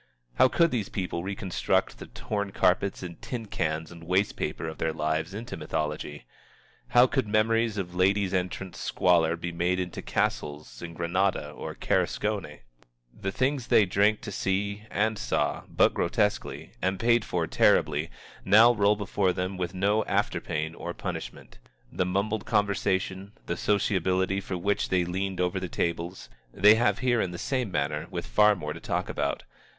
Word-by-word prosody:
How - - +8
could 170 +5 +3
these 110 -5 -2
people 90 -3 -3
reconstruct 95 -1 -1
the - - -8
torn 100 -2 -4
carpets 95 +1 +1
and 85 -2 -8
tin 120 -3 -5
cans 80 -4 -2
and 85 -1 -11
waste 95 +4 +1
paper - - -3
of 80 - -7
their 80 - 0
lives 80 +2 -1
into 115 +3 -6
mythology? 75 -2 -4 0.6
How 120 +1 +6
could 130 -3 0
memories 110 +1 +2
of 90 -3 -4
Ladies' 95 +1 +2
Entrance 90 0 -3
squalor 85 -2 +2
be 85 +1 -5
made 90 +2 0
into 90 -2 -4
Castles 75 -5 -2
in 85 -1 -7
Granada 90 +4 0
or - - -7
Carcassonne? - - -1 0.5
The 95 - -4
things 130 +2 0
they 105 - +5
drank 100 +3 +2
to 105 - -6
see, 100 +2 -2
and 110 0 0
saw - - -1
but - - +3
grotesquely, - - -1
and 95 +1 0
paid 120 0 +3
for 85 -4 -1
terribly, - - +2 0.3
now 115 +4 +7
roll 105 -1 +3
before 100 -2 0
them 90 +2 -3
with 90 0 -4
no 100 +3 +2
after 100 +1 0
pain 80 +1 -3
or 85 +1 -6
punishment. - - -7 0.3
The 90 - -1
mumbled 100 +3 -1
conversation, 100 -1 0
the - - -2
sociability 95 -1 +1
for 95 -1 -4
which 100 +3 0
they 90 -2 +2
leaned 95 +1 -3
over 90 +1 0
the 90 - -5
tables, 85 +2 -3 0.2
they 105 - +6
have 120 +3 +2
here 120 -2 +3
in 95 - -1
the 85 - -7
same 125 +2 -1
manner 75 -2 -2
with - - -4
far 105 0 +4
more 75 -5 -5
to - - -9
talk - - -2
about. - - -2
95 Hz, 165 wpm, -27 LUFS, 85-105 Hz, 0.6 s, How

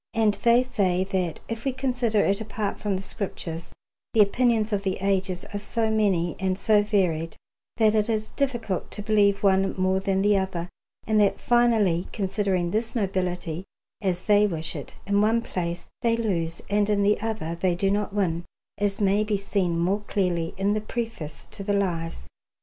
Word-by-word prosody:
And 220 -2 +3
they 235 +3 +4
say 185 -7 +1
that 185 -4 -2
if 230 0 -5
we 270 - +1
consider 250 -5 0
it 200 +2 +1
apart 215 -1 -3
from 205 -2 -1
the 190 - -4
Scriptures, 170 -4 -5 0.4
the 220 - +7
opinions 220 0 +2
of 200 - +1
the 190 -2 -1
ages 190 -1 -1
are 205 - -2
so 220 +2 -1
many 190 -6 +1
and 190 -1 0
so 210 +1 +4
varied 180 -6 0 0.4
that 220 -2 +4
it 215 +1 +1
is 215 -1 -1
difficult 240 -9 -2
to 205 - -6
believe 205 -2 +3
one 195 -1 +3
more 185 0 +2
than 195 0 0
the 205 0 +4
other; 180 -2 -3 0.4
and 215 -1 +2
that 200 - +2
finally, 225 -8 +3
considering 190 -3 0
this 225 +4 -1
nobility 180 -5 -2 0.4
as 185 -3 -1
they 210 0 +4
wish 160 -4 -3
it, - - -8
in 200 0 +2
one 225 +2 +2
place 175 -3 -3 0.2
they 230 -2 +2
lose 170 -7 -1
and 205 0 +1
in 205 -1 +2
the 205 +1 +2
other 220 -7 -3
they 175 +1 0
do 195 +2 +1
not 210 +1 0
win, 175 -5 0 0.4
as 205 -1 0
may 200 +1 +3
be 210 -1 0
seen 190 -3 -1
more 185 +5 +1
clearly 175 -5 -1
in 200 +2 +1
the 215 - -1
Preface 215 -9 -5
to 200 - -6
the 205 +1 0
Lives. 165 - -2
200 Hz, 185 wpm, -25 LUFS, 185-215 Hz, 0.4 s, the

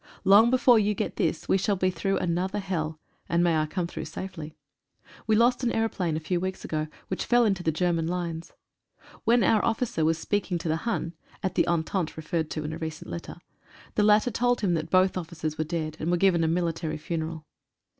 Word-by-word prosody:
Long 205 +4 +7
before 250 -2 +5
you 210 0 +1
get - - -3
this 160 -1 -1
we 195 - +3
shall 200 +2 +1
be 185 0 +1
through 195 +1 -1
another 180 +3 -1
hell, 165 -6 -3 0.3
and 170 0 +2
may 170 -2 +3
I 155 0 +1
come 180 +3 -2
through 170 - -6
safely. 160 -5 -7 0.7
We 220 - +4
lost 240 +3 +3
an 240 - +2
aeroplane 190 -8 -1
a - - -2
few 165 +3 -1
weeks 190 +1 -4
ago, 155 0 -2 0.2
which 185 - -2
fell 240 -1 +4
into 195 -4 +1
the 160 - +1
German 165 0 0
lines. 170 -1 -4 0.7
When 235 +1 +4
our 215 -2 +3
officer 225 -7 0
was 160 +1 +2
speaking 200 +1 -1
to 165 - -5
the 165 +8 -1
Hun 170 -7 -2 0.3
(at 190 - -1
the - - +2
entente 170 0 -1
referred 160 0 -2
to 155 - -4
in 155 +1 -4
a 160 - -6
recent 160 -2 -6
letter) 170 - -6 0.6
the - - +1
latter 210 +3 +4
told 245 +1 +1
him 190 -4 +1
that 160 -1 -2
both 185 +1 +3
officers 155 -3 -5
were - - +2
dead, 155 -1 -3
and 160 - -2
were 175 - +2
given 175 -2 +3
a - - +2
military 165 -1 -1
funeral. 160 0 -4
175 Hz, 210 wpm, -27 LUFS, 160-200 Hz, 0.7 s, Long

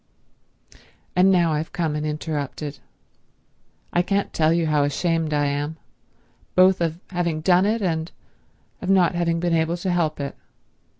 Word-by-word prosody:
"And 185 +1 +5
now 170 -4 +3
I've 155 +2 -3
come 160 -3 -1
and 150 0 -2
interrupted. 150 -1 -4 1.1
I 175 - +4
can't 200 +2 -1
tell 155 0 +3
you 170 0 +2
how 150 -2 +2
ashamed 160 +2 0
I 145 -1 +1
am—both 160 +5 -1
of 165 0 -1
having 170 -3 -1
done 180 +3 +4
it 220 0 0
and 160 -2 -1 0.7
of 185 - -4
not 185 -3 +4
having 170 -1 0
been 175 0 0
able 165 +1 +1
to 180 +1 -2
help 160 -4 0
it." 140 -1 -4
165 Hz, 145 wpm, -23 LUFS, 155-175 Hz, 1.1 s, And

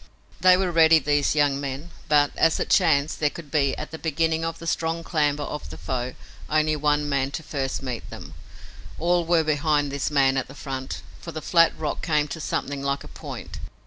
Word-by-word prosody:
They 185 +1 +6
were 185 -1 0
ready, 165 -1 +6
these 145 0 +1
young 145 -2 +2
men, 140 +4 -5 0.2
but, 145 -1 +4
as 165 - +3
it - - -2
chanced, 155 -5 +3
there 150 - +2
could 150 -2 -11
be, 140 -3 +1
at 155 - -6
the 160 - -7
beginning 160 +1 0
of 165 0 -3
the 165 - -10
strong 165 0 -1
clamber 150 -3 0
of 150 - -6
the - - -9
foe, 125 -1 -3 0.3
only 155 0 +2
one 150 0 +1
man 140 -2 0
to 160 - -6
first 135 -2 -3
meet 125 -3 -5
them. - - -10 0.6
All 175 +1 +2
were 170 -1 +4
behind 150 -1 +1
this 140 -1 -1
man 135 -2 +3
at 130 - -1
the 135 - -12
front, 135 -2 -5 0.2
for 170 - -8
the 160 - -5
flat 165 +2 +4
rock 150 -2 -3
came 150 -3 +1
to 160 - -6
something 145 -2 -3
like 140 0 -2
a - - -11
point. - - -8
150 Hz, 210 wpm, -24 LUFS, 140-160 Hz, 0.6 s, They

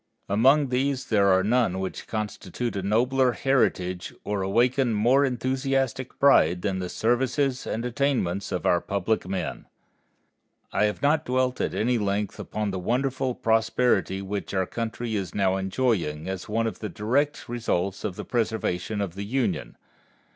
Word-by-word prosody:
Among 135 +8 +4
these 130 +1 0
there 100 -3 +4
are 95 -1 +4
none 110 -3 +2
which 95 0 -5
constitute 110 +1 -4
a 100 - -1
nobler 125 +6 +2
heritage 95 -10 0
or 100 -1 -2
awaken 120 +5 +2
more 125 +7 +4
enthusiastic 130 0 -1
pride 90 - +4
than 95 -3 -1
the 90 -1 -4
services 130 +4 0
and 115 +2 -2
attainments 120 -8 0
of 90 - -2
our 85 - +3
public 100 0 -1
men. 95 0 -4 1.1
I 105 - +3
have 105 +5 -2
not 150 +2 +3
dwelt 130 -1 0
at - - -1
any 120 +2 +1
length 100 0 -1
upon 105 -1 -3
the 95 - -3
wonderful 130 +5 -1
prosperity 110 -3 +1
which 100 0 -4
our 95 -1 +2
country 115 +2 -4
is 95 -3 -3
now 95 -2 +2
enjoying, 95 -6 -1
as 95 0 -5
one 115 +2 0
of 110 -5 -3
the 105 - -4
direct 130 - -1
results 100 -5 -2
of 95 - -3
the - - -6
preservation 110 -4 -1
of 95 -4 -3
the 100 +2 -5
Union. 125 +4 -2
110 Hz, 155 wpm, -26 LUFS, 95-130 Hz, 1.1 s, Among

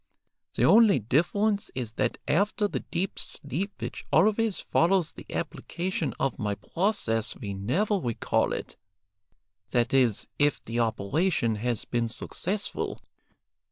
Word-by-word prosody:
The - - +3
only 220 -3 +7
difference 200 - +1
is 120 -4 -3
that - - -1
after 205 +5 +2
the - - -3
deep 180 +2 -3
sleep 165 +9 -2
which - - -5
always 215 -1 +3
follows 175 -1 +2
the - - -12
application 175 -3 -3
of 135 -1 -1
my 105 -3 -1
process 115 - -1
we 100 -6 -5
never 175 - 0
recall 120 -9 0
it, - - -5 0.9
that 120 +1 +1
is, 125 -6 +3
if 145 -1 +3
the 115 +1 -2
operation 115 - +1
has 120 0 -1
been 120 -1 0
successful. 190 - -3
145 Hz, 125 wpm, -27 LUFS, -, 0.9 s, only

